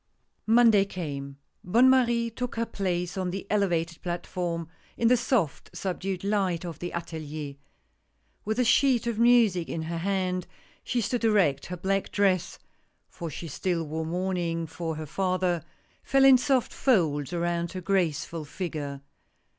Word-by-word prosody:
M 225 - +4
onday 220 -5 +5
came. 140 -6 -5 0.3
Bonne 235 +8 +5
Marie 240 -3 +3
took 250 +2 -4
her 230 0 0
place 180 -2 -2
on 185 -1 -1
the 190 +2 -5
elevated 175 -5 0
platform, 175 -1 -3 0.3
in 230 - +3
the 250 - +6
soft, 235 - 0
subdued 185 +1 -3
light 195 -4 0
of 165 -4 -6
the 175 - -4
atelier. 155 -4 -5 0.9
With 220 +2 -2
a 250 - +3
sheet 245 0 +3
of 235 -2 -2
music 230 -8 +4
in 160 - -3
her 165 +1 -3
hand, 185 -1 -1 0.4
she 245 - -1
stood 235 +2 -1
erect, 195 -11 +2
her 180 - -5
black 195 +2 -1
dress 190 -3 +1 0.3
— - - -45
for 170 -2 -6
she 165 +2 -7
still 170 +3 -1
wore 160 +1 -4
mourn 185 +2 -1
ing 165 -1 -1
for 165 0 -4
her 155 0 -5
father 185 0 0 0.2
— - - -37
fell 270 0 +4
in 265 -2 +8
soft 265 -2 +1
folds 160 - +1
around 170 -1 -1
her 185 - -5
graceful 170 -4 0
figure. 145 -3 -5
180 Hz, 160 wpm, -27 LUFS, 165-215 Hz, 0.9 s, in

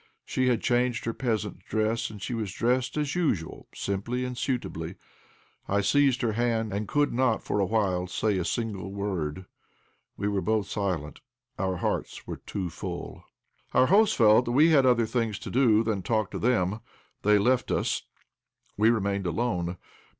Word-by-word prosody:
She 130 0 0
had 125 -2 +1
changed 120 -1 +1
her 115 - -1
peasant 110 -7 -2
dress, 110 +4 -1
and 105 -1 -9 0.2
was 110 -4 -3
dressed 125 +7 0
as 150 -2 -1
usual, 130 - -1
simply 120 +6 -2
and 125 0 -4
suitably. 125 0 -3 0.7
I 100 +1 +1
seized 135 +4 +3
her 115 - +2
hand, 115 -1 0
and 100 +1 -2
could 145 0 +1
not 125 -2 +1
for - - -1
a 100 - +2
while 95 -4 0
say 100 +2 0
a - - 0
single 100 -1 -3
word. 95 -4 -3 0.7
We 100 - -1
were 100 -2 0
both 110 -1 0
silent, 90 -8 -3 0.4
our 95 -1 0
hearts - - -3
were - - -6
too 95 -4 -5
full. - - -7 0.5
Our - - +6
hosts 215 +1 +5
felt 110 +2 +5
we 145 +7 +5
had 135 -4 +5
other 120 -2 +4
things 115 -2 -1
to - - -7
do 115 -4 +4
than 110 -4 -1
to - - -11
talk 110 -3 0
to - - -4
them; 105 -4 +1 0.4
they 105 0 +4
left 125 +5 +2
us. - - 0 0.7
We 110 +2 +4
remained 100 -4 0
alone. 90 -3 -1
110 Hz, 170 wpm, -27 LUFS, 100-125 Hz, 0.7 s, Our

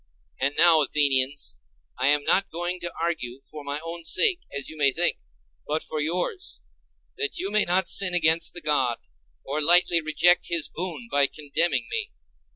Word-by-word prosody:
And 140 +2 0
now, 165 -2 +6
Athenians, 140 - 0 0.4
I 130 - +1
am 145 0 +3
not 195 +5 +2
going 175 +2 -4
to 175 0 -4
argue 155 -7 -3
for 150 -1 -10
my 145 +1 -4
own 165 +1 -7
sake, 375 - +2
as 140 -1 -4
you 155 - -7
may 145 -3 +2
think, 175 +6 0 0.5
but 155 +2 -1
for 155 - -4
yours, 180 - -3 0.6
that 435 -1 -3
you 195 - -3
may 215 0 +2
not 180 +1 +2
sin 185 -2 +2
against 165 0 +2
the 175 - -5
God, 130 -7 +1 0.5
or 145 +3 -2
lightly 170 +1 +5
reject 165 +3 +2
his 170 -3 0
boon 160 -8 -5
by 140 0 +3
condemning 145 -4 -1
me. - - -3
160 Hz, 170 wpm, -25 LUFS, 145-175 Hz, 0.6 s, now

